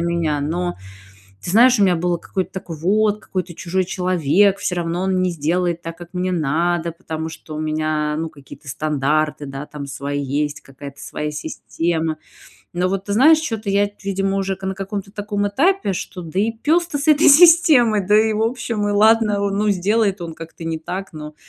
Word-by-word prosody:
меня. 170 -3 0
Но 175 +4 -2 0.7
ты - - -5
знаешь, 240 +4 +5
у - - +5
меня 185 -2 +4
было 175 +1 0
какое-то 185 +1 -4
такое: 175 -4 -7
вот, 210 +5 +1
какой-то 180 -3 -5
чужой 185 +1 -1
человек, 185 +2 +2
всё 180 - -2
равно 170 0 -2
он 190 -1 +1
не 180 -1 +1
сделает 170 +2 -1
так, 165 0 -7
как 175 -1 -11
мне 185 0 -1
надо, 170 +2 0
потому 160 -2 -6
что 160 -1 -10
у - - -4
меня, 155 -1 -1
ну, 165 0 -3
какие-то 140 0 -15
стандарты, 150 +1 -1
да, 135 +2 -6
там 145 -2 -8
свои 140 +1 -4
есть, 145 +2 -2
какая-то 140 +1 -11
своя 150 0 -4
система. 160 +1 -3 0.6
Но 180 +1 0
вот 195 0 -2
ты 200 - -3
знаешь, 305 +9 +6
чё-то 225 -9 -3
я, 200 +1 +3
т 205 - -11
видимо, 195 0 -1
уже 195 -1 -1
ка 190 - -7
на 190 - -2
каком-то 195 0 -6
таком 205 -1 -2
этапе, 335 - +1
что 180 0 -6
да 170 +4 -2
и 220 - +1
пес-то 305 +7 0
с 280 - -3
этой 305 0 +5
системой, 285 - +6
да 210 +3 +4
и, 220 0 +2
в 215 +1 -1
общем, 225 -3 -1
и - - 0
ладно, 215 0 +4
а, - - -1
ну 210 +1 +1
сделает 200 +1 +1
он 165 -2 -6
как-то 165 +1 -10
не 160 -1 -3
так, 185 +3 -6
но 150 -1 -9
180 Hz, 200 wpm, -20 LUFS, 160-205 Hz, 0.7 s, знаешь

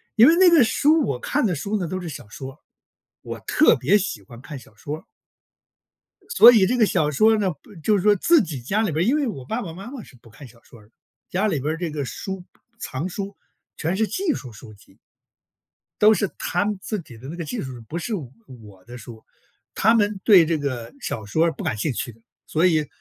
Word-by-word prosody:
因 230 +2 +7
为 325 - +6
那 365 0 +6
个 330 -6 +6
书 300 +7 +3
我 125 - -3
看 290 - -1
的 195 - +1
书 200 +8 -2
呢， 175 - -3
都 185 +3 -4
是 175 - -6
小 120 - -9
说， 135 +6 -9 0.6
我 - - -7
特 310 - +4
别 205 - +3
喜 190 - -3
欢 115 +5 -14
看 145 +1 -8
小 120 -4 -16
说。 150 +8 -7 1.3
所 245 - +9
以 215 -5 +5
这 250 +6 0
个 225 - +5
小 150 -6 +1
说 220 +9 +4
呢， 195 -3 0
不 160 +6 -15
就 210 +5 +3
是 180 - -2
说 210 0 +5
自 325 - +4
己 150 - -5
家 200 - -1
里 215 -5 0
边 160 +3 0
儿 - - 0
因 265 - +3
为 295 -3 0
我 135 - -6
爸 225 - -3
爸 165 -4 -7
妈 195 +6 -9
妈 260 -4 -8
是 135 - -17
不 115 -1 -19
看 130 +5 -13
小 115 0 -20
说 120 - -17
儿 105 - -19
的， - - -33 0.4
家 195 +4 0
里 155 -8 -1
边 150 +4 -2
儿 - - -5
这 175 -1 -3
个 145 -2 -3
书 190 +6 -6 0.4
藏 145 -3 -4
书 200 +1 -6 0.4
全 165 +4 -1
是 220 - +1
技 370 - -1
术 130 - -8
书 110 0 -13
籍。 100 - -22 1.0
都 215 +1 +6
是 200 -1 -1
他 - - -1
们 205 -1 -2
自 215 - -3
己 125 -8 -14
的 125 +4 -11
那 160 - -6
个 170 - -5
技 225 +9 -5
术， 130 -2 -6 0.2
不 170 - -3
是 220 +5 -3
我 115 - -12
的 120 +1 -10
书， 115 -2 -12 0.5
他 220 +3 +4
们 210 -2 +1
对 190 -6 +7
这 165 0 0
个 130 -5 -5
小 110 - -4
说 160 +11 +1
不 145 - -9
感 105 - -2
兴 145 +8 -1
趣 120 - -4
的， 115 - -25 0.3
所 160 +3 +1
以 155 -5 +2
170 Hz, 255 characters per minute, -23 LUFS, 130-215 Hz, 1.3 s, 所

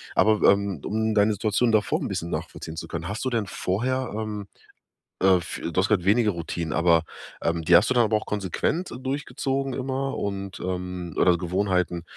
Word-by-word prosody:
aber, 110 -1 +4
ähm, 100 -6 -1
um 110 +1 0
deine 105 0 +4
Situation 110 +3 +1
davor 110 -2 +2
'n - - -2
bisschen 85 - -3
nachvollziehen 80 0 -5
zu 80 - -5
können, 85 +1 -5
hast 105 +3 -4
du - - +2
denn 115 -4 0
vorher, 125 +8 -1
ähm, 105 -2 -4 0.8
äh, 95 -1 +6
f 85 -2 -5
du 85 +2 -3
hast 95 - +2
grad 100 -5 +1
weniger 105 +2 +3
Routinen, 85 -2 -4
aber, 85 -1 +3 0.4
ähm, 85 0 0
die 85 +2 +6
hast 90 +6 +4
du - - +2
dann 120 - +5
aber 110 0 +2
auch 105 - -4
konsequent 105 - -1
durchgezogen 135 0 -2
immer 135 +1 -2
und, 100 -1 -4
ähm 90 -2 -4
oder 90 -1 +4
Gewohnheiten, 90 -1 0
100 Hz, 185 wpm, -25 LUFS, 90-110 Hz, 0.8 s, äh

